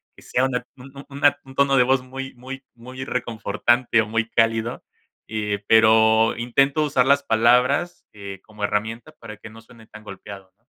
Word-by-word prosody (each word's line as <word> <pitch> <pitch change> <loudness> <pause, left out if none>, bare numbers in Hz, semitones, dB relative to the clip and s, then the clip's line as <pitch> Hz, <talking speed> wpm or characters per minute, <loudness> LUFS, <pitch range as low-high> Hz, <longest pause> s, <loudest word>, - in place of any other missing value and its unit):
que - - -18
sea 130 +1 0
una 125 -1 -3
un 130 +1 -13
un 140 - -11
una 140 +1 +2
un 135 - -14
tono 140 0 +3
de 125 - +6
voz 130 +1 +2
muy 135 +1 -8
muy 130 +2 -9
muy 130 +2 -9
reconfortante 120 0 0
o 110 - -4
muy 110 0 -1
cálido, 115 0 0 0.4
eh, 105 -2 -3
pero 110 0 +4
intento 135 +5 +1
usar 140 -4 +1
las 140 +1 +3
palabras, 125 +9 +2
eh, 100 -2 -9
como 105 -1 -11
herramienta 110 +7 -3
para 110 -7 -11
que 110 - -12
no 115 +1 -14
suene 115 -1 -18
tan 110 0 -14
golpeado, 95 -1 -11
¿no? 115 - -44
120 Hz, 185 wpm, -22 LUFS, 110-130 Hz, 0.4 s, de